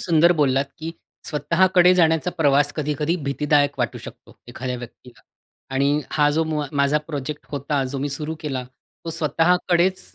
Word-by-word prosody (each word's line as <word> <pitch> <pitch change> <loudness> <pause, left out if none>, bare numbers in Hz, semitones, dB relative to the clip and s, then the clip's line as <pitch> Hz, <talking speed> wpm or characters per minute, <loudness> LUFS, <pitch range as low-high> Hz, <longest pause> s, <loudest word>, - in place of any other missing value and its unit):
सुंदर 170 0 +4
बोललात, 135 -1 +2
की 160 +1 -5 0.4
स्वतःकडे 180 +4 +3
जाण्याचा 165 -1 +2
प्रवास 145 -1 +3
कधी-कधी 150 +2 -1
भीतीदायक 145 0 +1
वाटू 120 -4 -2
शकतो - - -13
एखाद्या 125 0 -4
व्यक्तीला. 120 0 -12 0.5
आणि 140 +2 +2
हा 150 -1 +3
जो 160 - +2
मुआ 155 -2 -2
माझा 140 +2 +3
प्रोजेक्ट 145 -1 -5
होता 140 0 -1
जो 140 - -3
मी 140 +2 -2
सुरु 150 +3 -3
केला 135 -4 -3 0.4
तो 165 - -4
स्वतःकडेच 175 +3 +2
150 Hz, 150 wpm, -22 LUFS, 140-165 Hz, 0.5 s, सुंदर